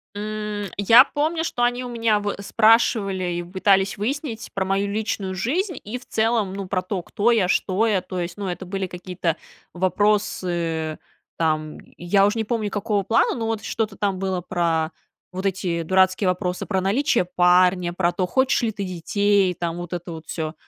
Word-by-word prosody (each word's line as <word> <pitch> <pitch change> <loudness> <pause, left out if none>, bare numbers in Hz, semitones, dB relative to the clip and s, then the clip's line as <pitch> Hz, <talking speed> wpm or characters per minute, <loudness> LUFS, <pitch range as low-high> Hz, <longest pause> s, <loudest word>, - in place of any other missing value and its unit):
М, 210 -1 -4
я 205 +4 +7
помню, 320 +3 -1
что 245 -6 -1
они 245 +1 +1
у 250 - -6
меня 230 -3 +1
вот 205 -1 -3
спрашивали 215 -4 +3
и 175 0 -3
пытались 190 +1 +2
выяснить 240 +2 -4
про 195 - -1
мою 195 +1 0
личную 200 -2 -2
жизнь 320 - -1
и 215 +5 -5
в 250 - -14
целом, 220 -3 +1
ну, 195 -1 -5
про 185 -1 -1
то, 185 0 -3
кто 225 +6 +1
я, 210 -6 +3
что 195 +4 +1
я. 200 -4 +2
То 185 0 -6
есть, 175 +2 -4
ну, 200 - -4
это 180 +1 -4
были 195 +1 -3
какие-то 180 -2 -3 0.4
вопросы, 175 -4 0 0.4
там, 155 -2 -1 0.2
я 195 +3 +3
уж 205 - -1
не 225 - 0
помню, 220 -2 -2
какого 205 0 -1
плана, 225 +4 +2
но 225 -2 -3
вот 225 -1 -2
что-то 220 -3 -2
там 195 -2 -1
было 190 -2 -1
про 165 -2 0 0.4
вот 185 +2 -2
эти 180 -3 -1
дурацкие 185 +3 +2
вопросы 180 0 -1
про 190 -2 0
наличие 225 - +1
парня, 180 0 +3
про 175 0 +1
то, 185 0 -1
хочешь 260 +8 +2
ли 230 - 0
ты 200 -1 -5
детей, 190 +1 +1
там, 170 0 -3
вот 175 0 -6
это 175 0 -5
вот 160 -1 -9
всё, 155 -2 -4
195 Hz, 185 wpm, -23 LUFS, 180-215 Hz, 0.4 s, я